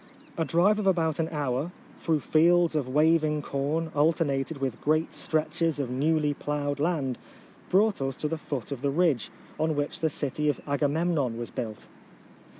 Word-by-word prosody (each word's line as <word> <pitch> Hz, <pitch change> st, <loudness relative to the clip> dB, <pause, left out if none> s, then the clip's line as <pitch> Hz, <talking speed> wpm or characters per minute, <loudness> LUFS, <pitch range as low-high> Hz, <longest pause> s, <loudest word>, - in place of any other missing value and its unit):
A 165 Hz, -, 0 dB
drive 185 Hz, +7 st, +3 dB
of 205 Hz, -, -1 dB
about 165 Hz, -5 st, +2 dB
an 160 Hz, -, 0 dB
hour, 145 Hz, +1 st, -2 dB, 0.3 s
through 160 Hz, -3 st, 0 dB
fields 170 Hz, +2 st, +3 dB
of 145 Hz, -4 st, 0 dB
waving 150 Hz, +1 st, +2 dB
corn 150 Hz, +4 st, -2 dB
alternated 150 Hz, -1 st, +1 dB
with 135 Hz, -3 st, -3 dB
great 155 Hz, +2 st, +1 dB
stretches 160 Hz, 0 st, -1 dB
of 130 Hz, -3 st, -2 dB
newly 150 Hz, +3 st, +1 dB
ploughed 145 Hz, 0 st, -2 dB
land, 145 Hz, -6 st, 0 dB, 0.5 s
brought 200 Hz, -2 st, +3 dB
us 135 Hz, -1 st, -1 dB
to 150 Hz, -, -2 dB
the 160 Hz, +1 st, -3 dB
foot 140 Hz, -5 st, -5 dB
of 135 Hz, -3 st, -4 dB
the 140 Hz, -, +1 dB
ridge 150 Hz, -4 st, +1 dB, 0.3 s
on 155 Hz, 0 st, +1 dB
which 145 Hz, 0 st, -2 dB
the 160 Hz, -, +1 dB
city 150 Hz, +1 st, -1 dB
of 145 Hz, -, -1 dB
Agamem 150 Hz, +4 st, +1 dB
non 130 Hz, -7 st, 0 dB
was 120 Hz, 0 st, -5 dB
built. 110 Hz, -2 st, -5 dB
150 Hz, 170 wpm, -27 LUFS, 140-165 Hz, 0.5 s, drive